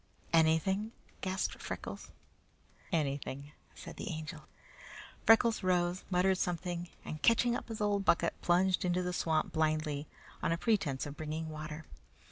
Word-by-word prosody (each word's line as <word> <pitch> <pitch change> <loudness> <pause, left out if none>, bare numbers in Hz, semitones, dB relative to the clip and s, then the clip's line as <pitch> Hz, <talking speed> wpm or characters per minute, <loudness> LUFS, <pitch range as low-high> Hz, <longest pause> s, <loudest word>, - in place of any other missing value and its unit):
"Anything!" 165 +7 +3 0.3
gasped 190 0 -2
Freckles. - - -6 0.8
"Anything," 140 -3 -2 0.2
said - - -9
the - - -4
Angel. 155 -2 -6 0.8
Freckles 225 -1 +6
arose, 180 0 +1
muttered 185 +1 +3
something, 175 0 -2 0.2
and 155 -1 -6
catching 235 +1 +4
up - - -5
his 225 -2 -5
old 205 -1 +2
bucket, 175 - +3
plunged 180 +1 +3
into 180 0 +1
the 180 0 -2
swamp 160 -3 0
blindly 155 -2 0 0.3
on - - +1
a 165 - +1
pretence 175 - +1
of 145 -1 -6
bringing 155 +1 -4
water. 155 0 -6
175 Hz, 135 wpm, -33 LUFS, 155-190 Hz, 0.8 s, Freckles